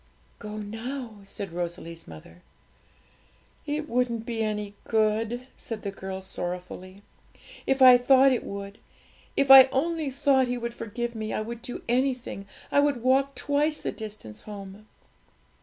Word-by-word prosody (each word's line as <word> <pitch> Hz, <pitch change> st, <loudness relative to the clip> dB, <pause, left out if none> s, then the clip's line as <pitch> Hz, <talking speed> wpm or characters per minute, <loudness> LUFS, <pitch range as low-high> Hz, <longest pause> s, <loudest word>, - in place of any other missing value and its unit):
'Go 210 Hz, 0 st, -7 dB
now,' 225 Hz, +2 st, -6 dB
said 195 Hz, -1 st, -6 dB
Rosalie's 170 Hz, -1 st, -5 dB
mother. 80 Hz, +2 st, -13 dB, 1.3 s
'It 300 Hz, +1 st, -2 dB
wouldn't 235 Hz, -3 st, 0 dB
be 230 Hz, -1 st, -3 dB
any 210 Hz, -1 st, -2 dB
good,' 225 Hz, +2 st, +1 dB
said 225 Hz, -2 st, -6 dB
the 200 Hz, -, -3 dB
girl 190 Hz, -1 st, -6 dB
sorrowfully; 185 Hz, +1 st, -6 dB, 0.6 s
'if 270 Hz, 0 st, +3 dB
I 250 Hz, -1 st, +9 dB
thought 265 Hz, +2 st, +6 dB
it 250 Hz, -, 0 dB
would 200 Hz, 0 st, -7 dB, 0.6 s
if 275 Hz, -1 st, +4 dB
I 265 Hz, -1 st, +12 dB
only 300 Hz, +3 st, -1 dB
thought 270 Hz, -1 st, +2 dB
He 245 Hz, 0 st, -1 dB
would 235 Hz, 0 st, -4 dB
forgive 235 Hz, +1 st, -4 dB
me, 220 Hz, -1 st, -4 dB
I -, -, -1 dB
would 235 Hz, +2 st, -6 dB
do 250 Hz, 0 st, -7 dB
anything 250 Hz, -5 st, -1 dB, 0.2 s
I -, -, +4 dB
would 285 Hz, -5 st, +1 dB
walk 270 Hz, +2 st, +3 dB
twice 295 Hz, +2 st, +1 dB
the -, -, -3 dB
distance 210 Hz, -, -8 dB
home!' 205 Hz, 0 st, -10 dB
230 Hz, 145 wpm, -27 LUFS, 200-260 Hz, 1.3 s, I